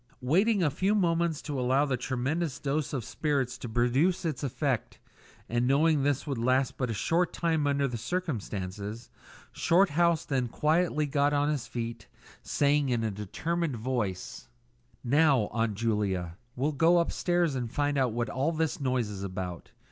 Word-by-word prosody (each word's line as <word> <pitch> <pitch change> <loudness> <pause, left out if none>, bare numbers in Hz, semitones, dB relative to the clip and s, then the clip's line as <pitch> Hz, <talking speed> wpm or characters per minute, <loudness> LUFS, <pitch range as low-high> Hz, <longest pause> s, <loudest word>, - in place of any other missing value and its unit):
Waiting 190 - +3
a 150 - +2
few 190 +8 +1
moments 170 -4 +1
to 145 -4 -3
allow 130 +3 +2
the 135 -3 0
tremendous 135 +5 -2
dose 145 0 -2
of 130 -5 -3
spirits 140 -5 -1
to 120 - -6
produce 130 - +1
its 155 -5 -2
effect, 135 -2 -2 0.5
and 120 +1 0
knowing 150 +2 +3
this 140 -1 0
would 140 -5 -3
last 130 +2 +1
but 125 -2 -2
a - - -1
short 170 - +1
time 160 -4 0
under 140 -1 +1
the 120 -3 -4
circumstances, 110 - -4 0.4
Shorthouse 170 -2 +3
then 130 -3 0
quietly 155 +4 +1
got 145 0 +1
on 145 0 +2
his 140 -5 -2
feet, 115 -1 -5 0.3
saying 145 -1 +1
in 120 -2 0
a 110 - 0
determined 150 - -2
voice 110 -6 -3 0.5
"Now, 135 -3 +3
Aunt 115 -2 0
Julia, 100 -6 -1 0.2
we'll 140 +5 0
go 165 +5 +4
upstairs 175 -1 +1
and 120 -3 -3
find 145 +1 0
out 130 -3 +2
what 120 +2 -1
all 135 +6 0
this 160 -2 -1
noise 130 -4 0
is 100 -2 -7
about. 90 -3 -5
135 Hz, 165 wpm, -29 LUFS, 120-155 Hz, 0.5 s, go